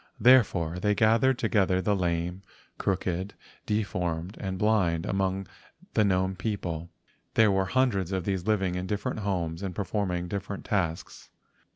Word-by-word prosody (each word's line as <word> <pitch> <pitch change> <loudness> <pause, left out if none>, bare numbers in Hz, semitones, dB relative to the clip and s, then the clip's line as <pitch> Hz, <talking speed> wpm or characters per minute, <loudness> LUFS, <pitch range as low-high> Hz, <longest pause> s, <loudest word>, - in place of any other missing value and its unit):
Therefore 100 -9 +4
they 105 +2 +1
gathered 115 +5 +4
together 100 -6 +2
the 105 +2 +1
lame, 90 0 -1 0.4
crooked, 95 0 -1 0.3
de¬ 105 0 +1
formed, 90 +1 -3
and 95 -1 -3
blind 95 -6 +2
among 95 0 -1 0.5
the 110 - +4
gnome 95 -1 +1
people. 90 -5 -3 0.5
There 110 -2 +5
were 95 0 +2
hundreds 100 -4 +1
of 95 -2 -1
these 95 -1 -2
living 95 -4 +1
in 90 +1 -3
different 105 +2 -2
homes, 90 -5 -2
and 95 -3 -4
performing 95 -3 -2
different 100 +1 -5
tasks. 85 -5 -2
95 Hz, 145 wpm, -28 LUFS, 90-105 Hz, 0.5 s, There